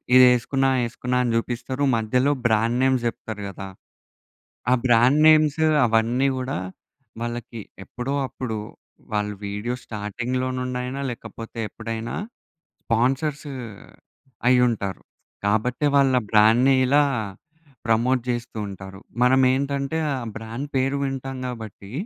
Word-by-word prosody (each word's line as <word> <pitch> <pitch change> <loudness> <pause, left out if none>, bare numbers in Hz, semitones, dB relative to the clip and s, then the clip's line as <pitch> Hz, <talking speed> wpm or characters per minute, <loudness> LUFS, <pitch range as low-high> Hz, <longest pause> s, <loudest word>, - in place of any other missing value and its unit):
ఇది 130 - +9
ఏసుకున్నా, 135 +3 +1 0.2
ఏసుకున్నా 125 +2 -2
అని 120 - 0
చూపిస్తారు, 125 +4 -3
మధ్యలో 125 +6 +1
బ్రాండ్ 115 +1 +2
నే‌మ్స్ 130 -2 +2
చెప్తారు 110 -2 -6
గదా! 95 0 -8 1.0
ఆహ్, 130 - +4
బ్రాండ్ 125 +5 +5
నే‌మ్స్ 155 -1 +5 0.2
అవన్నీ 120 +4 +2
గూడా, 130 -6 -3 0.7
వాళ్ళకి 120 -1 -5 0.2
ఎప్పుడో 125 +7 -4
అప్పుడు 120 -4 -5 0.6
వాళ్ళు 105 0 -1
వీడియో 105 +5 -3
స్టార్టింగ్‌లో 120 +4 -3
నుండి 125 0 -3
అయినా 130 +2 -4
లేకపోతే, 115 -1 -9
ఎప్పుడైనా 115 0 -5 0.7
స్పాన్సర్స్ 135 +6 0 1.0
అయ్యి 125 -1 +5
ఉంటారు. 100 -4 -3 0.5
కాబట్టే, 120 +7 +1
వాళ్ళ 135 -1 +4
ఆ - - -12
బ్రాండ్‌ని 115 +5 +5
ఇలా 145 +2 +5 0.8
ప్రమోట్ 120 +3 +2
చేస్తూ 120 -1 -5
ఉంటారు. 95 -1 -9 0.2
మనం 130 +1 +5
ఏంటంటే, 140 +2 -1 0.2
ఆ - - -1 0.2
బ్రాండ్ 115 +5 -6
పేరు 135 +1 +1
వింటాం 135 -1 -4
గాబట్టి, 110 -5 -8
125 Hz, 115 wpm, -23 LUFS, 110-130 Hz, 1.0 s, ఇది